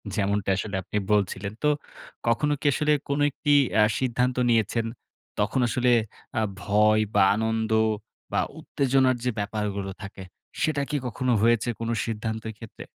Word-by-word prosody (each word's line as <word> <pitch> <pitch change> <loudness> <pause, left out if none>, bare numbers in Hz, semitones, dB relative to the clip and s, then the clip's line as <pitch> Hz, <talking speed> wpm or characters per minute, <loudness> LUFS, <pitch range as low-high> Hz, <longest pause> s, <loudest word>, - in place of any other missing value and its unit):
যেমনটা 100 -1 0
আসলে 100 +1 -3
আপনি 100 - -4
বলছিলেন। 100 -1 0
তো 150 - +4 0.6
কখনো 145 +6 +2
কি - - -10
আসলে 150 +1 +1 0.2
কোনো 140 +1 0
একটি 145 +2 -1 0.3
আ - - +7 0.2
সিদ্ধান্ত 125 0 0
নিয়েছেন, 115 0 +2 0.5
তখন 105 +6 +1
আসলে 125 +1 +2 0.5
আ - - +1 0.2
ভয় 105 +3 +3
বা, - - +6
আনন্দ 110 0 -1 0.6
বা - - +1 0.2
উত্তেজনার 130 -1 +2
যে 125 - +1
ব্যাপারগুলো 100 -1 -3
থাকে, 100 -1 -8 0.4
সেটা 155 -3 +1
কি 150 - 0
কখনো 125 +1 -1
হয়েছে 115 0 +3
কোন 115 0 -3 0.2
সিদ্ধান্তর 110 0 -4
ক্ষেত্রে? 115 -2 -10
110 Hz, 145 wpm, -26 LUFS, 105-125 Hz, 0.6 s, আ